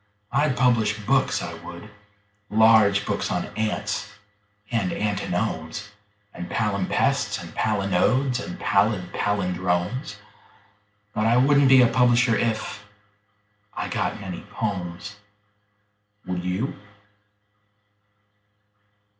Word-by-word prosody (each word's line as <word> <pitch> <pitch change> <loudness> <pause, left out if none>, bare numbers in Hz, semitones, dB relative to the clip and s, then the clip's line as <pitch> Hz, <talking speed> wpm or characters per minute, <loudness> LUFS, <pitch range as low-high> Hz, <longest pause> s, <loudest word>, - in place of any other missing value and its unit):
I'd 140 -1 +1
publish 115 -4 +2
books, 135 +3 +2
I - - -5
would 85 +4 -9 0.6
large 110 -2 +5
books - - -2
on - - -1
ants 105 -1 -2 0.6
and 115 -6 0
antinomes 100 -2 -2 0.4
And 90 - -7
palimpsests 100 -4 0
and - - -10
palinodes 110 +5 +1
and 90 - -7
pallid 100 -3 +1
pallindromes: 90 - -1 1.0
But 110 +1 +1
I 120 +2 +4
wouldn't 140 +1 +5
be 130 -1 +8
a - - +5
publisher 120 -1 +3
if.... 110 -2 -2 0.9
I - - -3
got - - -2
many 95 -3 -6
"pomes." 100 -1 -4 1.1
Would 90 -1 -3
you? 95 +8 -2
105 Hz, 95 wpm, -24 LUFS, 95-120 Hz, 1.1 s, be